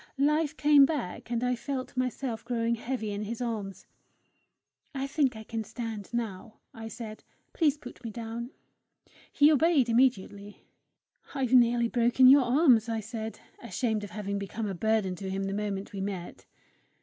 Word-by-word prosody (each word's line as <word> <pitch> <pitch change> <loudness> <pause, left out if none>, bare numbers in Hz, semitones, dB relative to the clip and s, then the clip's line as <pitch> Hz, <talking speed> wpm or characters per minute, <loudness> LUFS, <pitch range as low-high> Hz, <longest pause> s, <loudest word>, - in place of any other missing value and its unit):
Life 300 +2 +1
came 295 -1 +6
back, 265 - -4
and 240 0 -1
I 250 0 +1
felt 260 +1 -5
myself 250 -2 -2
growing 235 -1 0
heavy 235 -2 -3
in 205 0 -4
his 230 +2 -5
arms. 215 -5 -4 1.1
"I 270 0 -2
think 275 -3 +1
I 220 - -8
can 225 0 -4
stand 220 -2 -6
now," 225 -2 -4 0.2
I 225 0 -8
said. 220 -1 -8 0.3
"Please 305 -3 +2
put 250 -4 -12
me 230 - -4
down." 230 +2 -6 0.8
He 295 +1 +5
obeyed 305 -4 +3
immediately. 210 -4 0 0.7
"I've 260 -2 -1
nearly 240 -1 +5
broken 240 +2 +3
your 275 +2 +8
arms," 245 -3 +4
I 225 -1 -1
said, 220 0 -6 0.2
ashamed 230 -3 -2
of 205 - -6
having 205 -1 -4
become 200 +3 -4
a 200 - -3
burden 215 0 0
to 190 +2 -5
him 195 +1 -2
the 195 0 -2
moment 200 -1 -3
we 195 - -4
met. 190 -3 -6
230 Hz, 160 wpm, -29 LUFS, 210-255 Hz, 1.1 s, your